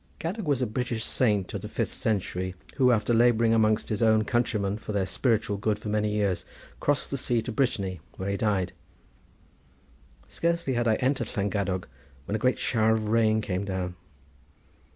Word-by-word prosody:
Gadog 185 +3 -3
was 135 -3 +2
a - - +2
British 115 0 -2
saint 105 -7 +1
of - - -3
the - - -7
fifth - - -2
century, 95 -3 -2 0.2
who 130 -3 +5
after 115 0 +2
labouring 115 -1 +4
amongst 110 -1 +2
his 105 0 -2
own 110 -1 +4
countrymen 105 -3 0
for 105 - -6
their 100 -2 +1
spiritual 110 -1 0
good 105 +1 0
for 105 0 -6
many 105 0 +1
years, 100 -3 0 0.4
crossed 145 -1 0
the 140 - -2
sea 120 -2 +1
to 125 - -4
Brittany, 100 -8 0 0.2
where 95 +1 -2
he - - 0
died. 95 -4 0 1.5
Scarcely 170 -5 -1
had 120 -1 +1
I 110 - +4
entered 130 -1 0
Llangadog 100 -2 -1 0.4
when - - -4
a - - -1
great 125 +3 +2
shower 110 -2 +2
of 110 -1 -1
rain 110 -1 +3
came 95 -2 -2
down. 95 -2 -3
110 Hz, 175 wpm, -27 LUFS, 100-120 Hz, 1.5 s, who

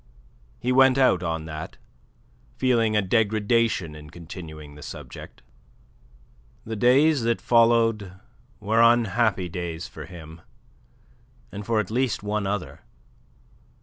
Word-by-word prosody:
He 125 - -2
went 130 0 +5
out 130 -9 +3
on 80 -2 -3
that, 80 0 -7 0.8
feeling 115 -4 +2
a 105 - +2
degradation 110 -3 +1
in 75 0 -12
continuing 80 -3 -10
the 75 - -13
subject. - - -10 1.2
The 110 - -5
days 135 +6 +4
that 115 0 0
followed 115 -4 +2 0.5
were 110 +2 +1
unhappy 115 -4 +3
days 85 -1 -5
for - - -10
him, 80 -2 -12 1.1
and 100 0 -8
for 115 -2 +2
at 105 -1 -3
least 125 -3 -1
one 105 -1 -2
other. 100 -2 -4
105 Hz, 115 wpm, -24 LUFS, 85-115 Hz, 1.2 s, went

